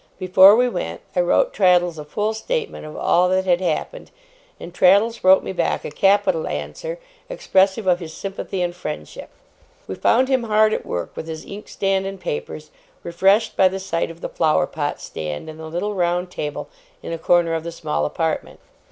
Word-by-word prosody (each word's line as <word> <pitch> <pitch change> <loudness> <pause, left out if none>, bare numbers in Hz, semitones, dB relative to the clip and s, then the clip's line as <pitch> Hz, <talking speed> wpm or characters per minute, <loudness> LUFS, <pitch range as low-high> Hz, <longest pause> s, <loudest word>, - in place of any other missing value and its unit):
Before 185 +2 +7
we 250 +2 +3
went, 245 - -4
I - - +1
wrote - - +2
Traddles 175 -3 +3
a - - -6
full 210 +8 -2
statement 445 - -4
of 155 - -10
all 180 +1 +2
that 190 0 +1
had 180 -1 +2
happened, - - -3 0.5
and 170 - -9
Traddles 200 +6 +3
wrote 190 +1 +6
me - - -4
back 190 - -1
a - - -5
capital 195 -1 +2
answer, - - -5 0.3
expressive 195 - +1
of 180 -1 +2
his 165 -3 -8
sympathy 195 +1 -4
and 175 0 -3
friendship. 150 - -7 0.6
We - - -6
found 250 - +2
him 260 -3 +1
hard 215 0 +3
at - - -4
work 85 -1 -4
with 160 - -7
his 160 -1 -7
inkstand 195 -1 -2
and 195 0 -7
papers, 475 0 -6 0.3
refreshed 195 +6 +2
by 190 - +5
the 190 +1 -3
sight 180 -4 -2
of 165 +1 -12
the - - -4
flower 155 -2 +2
pot 145 -2 -4
stand 75 - -6
and 155 0 -9
the 160 - -7
little 180 +6 -3
round 180 -1 -1
table 150 -3 -5 0.4
in - - -5
a 165 - -5
corner 170 0 +2
of 160 -1 -2
the 170 - -5
small 75 - -3
apartment. 75 - -3
185 Hz, 190 wpm, -21 LUFS, 165-205 Hz, 0.6 s, Before